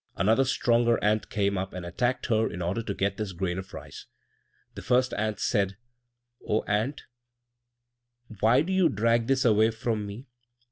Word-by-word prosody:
Another 115 +6 +3
stronger 120 -2 +2
ant 105 +1 +1
came 100 -2 0
up 95 +1 -5
and 90 -1 -6
attacked 120 +9 -1
her 110 -2 +1
in 85 - -6
order 90 +6 -1
to 110 -3 -4
get 100 0 -1
this 105 -3 -4
grain 90 0 -2
of 95 0 -9
rice. - - -10 0.7
The - - -8
first 125 +1 +2
ant 110 0 -2
said, 100 -4 0 0.7
"O 105 - 0
ant, 110 +8 -1 1.4
why 120 +7 +4
do 190 +4 -3
you 190 -2 +4
drag 115 +2 +1
this 135 -1 +2
away 110 -1 +4
from 110 -2 -3
me? 105 +6 -8
110 Hz, 170 wpm, -27 LUFS, 100-120 Hz, 1.4 s, why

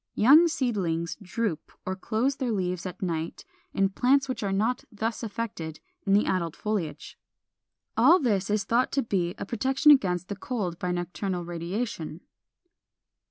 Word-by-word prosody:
Young 295 +9 +7
seedlings 195 - -1
droop 200 -3 -3
or 185 - -2
close 235 +7 -1
their 255 -3 -1
leaves 180 -3 -2
at 185 - -7
night 165 -2 -3 0.3
in 195 0 +2
plants 265 +7 +3
which 255 -3 -3
are 200 -2 -1
not 225 +6 0
thus 220 +1 -3
affected 205 -8 -5 0.3
in 195 - +4
the 205 - +4
adult 170 -4 -1
foliage. 180 -9 -4 0.8
All 365 - +6
this 205 -8 0
is 210 -1 +1
thought 240 +2 +1
to 275 - +2
be 180 -6 -1
a - - -5
protection 265 +7 +4
against 185 -10 +3
the 200 - -4
cold 195 -5 -3
by 180 - -1
nocturnal 180 +1 -3
radiation. 175 0 -4
200 Hz, 155 wpm, -27 LUFS, 180-235 Hz, 0.8 s, Young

